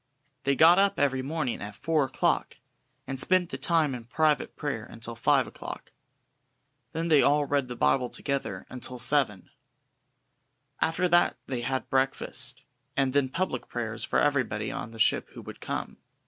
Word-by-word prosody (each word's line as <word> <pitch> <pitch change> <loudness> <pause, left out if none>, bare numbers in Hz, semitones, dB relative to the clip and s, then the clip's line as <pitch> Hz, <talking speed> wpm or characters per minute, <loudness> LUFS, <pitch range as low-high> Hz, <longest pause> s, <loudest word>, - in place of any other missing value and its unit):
They 140 0 +2
got 170 +6 +7
up 200 0 +2
every 135 -2 +2
morning 140 -2 -3
at 100 0 -7
four 160 +3 +1
o'clock, 130 - -1 0.5
and 135 -1 -5
spent 180 +4 +2
the - - -4
time 160 -5 +2
in 120 -2 -7
private 150 +3 +1
prayer 140 -7 -3
until 115 0 -8
five 115 - +3
o'clock. - - -9 1.0
Then 165 +1 -2
they 155 -4 +5
all 145 0 +3
read 140 -2 0
the 125 - -6
Bible 125 +1 +2
together 140 -1 -4
until 125 0 -5
seven. 120 -5 +2 1.3
After 170 +3 +1
that 175 0 +3
they 125 -3 -3
had 130 +2 -2
breakfast, 130 0 +1 0.3
and 135 -2 +1
then 140 -2 +2
public 170 -4 -2
prayers 115 -1 -4
for - - 0
everybody 125 -7 +1
on 110 - -5
the 115 - -12
ship 110 - +2
who - - -9
would - - -10
come. - - -4
135 Hz, 160 wpm, -28 LUFS, 120-150 Hz, 1.3 s, got